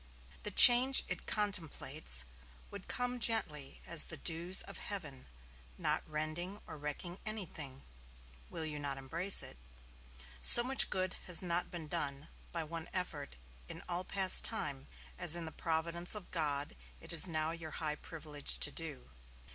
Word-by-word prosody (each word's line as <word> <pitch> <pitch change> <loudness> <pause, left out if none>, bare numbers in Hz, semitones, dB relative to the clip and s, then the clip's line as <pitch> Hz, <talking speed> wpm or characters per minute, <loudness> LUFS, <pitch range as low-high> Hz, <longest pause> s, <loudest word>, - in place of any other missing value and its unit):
The - - -5
change 250 +6 +9
it 180 -2 -7
contemplates 160 - -2 0.5
would 200 -2 -11
come 245 0 -4
gently 155 - -3
as 170 -2 +2
the 160 - -8
dews 170 +4 +2
of - - -10
heaven, 150 -10 -7 0.5
not - - -2
rending 155 +6 -6
or - - -11
wrecking 150 +5 -8
anything. 160 -11 -6 0.7
Will 165 -2 -7
you 150 -1 -7
not 140 -1 -5
embrace 165 +9 -1
it? - - -8 0.8
So 240 - +9
much 265 +2 +3
good 185 0 -4
has 180 0 +3
not 175 0 -2
been 170 -3 -9
done, 140 +1 -4 0.2
by 165 -1 -5
one 160 +1 -9
effort, 150 - -5 0.3
in - - -9
all 180 +1 -4
past 190 0 +5
time, 140 -11 -4 0.3
as 175 -2 +4
in 170 -1 -5
the 160 - -9
providence 170 +4 -3
of 210 -4 -9
God 145 - -3 0.2
it - - -8
is 170 +3 +5
now 155 -1 -3
your 165 -1 -9
high 155 -2 -4
privilege 150 - -2
to 60 - +3
do. 60 - -8
165 Hz, 155 wpm, -32 LUFS, 150-185 Hz, 0.8 s, change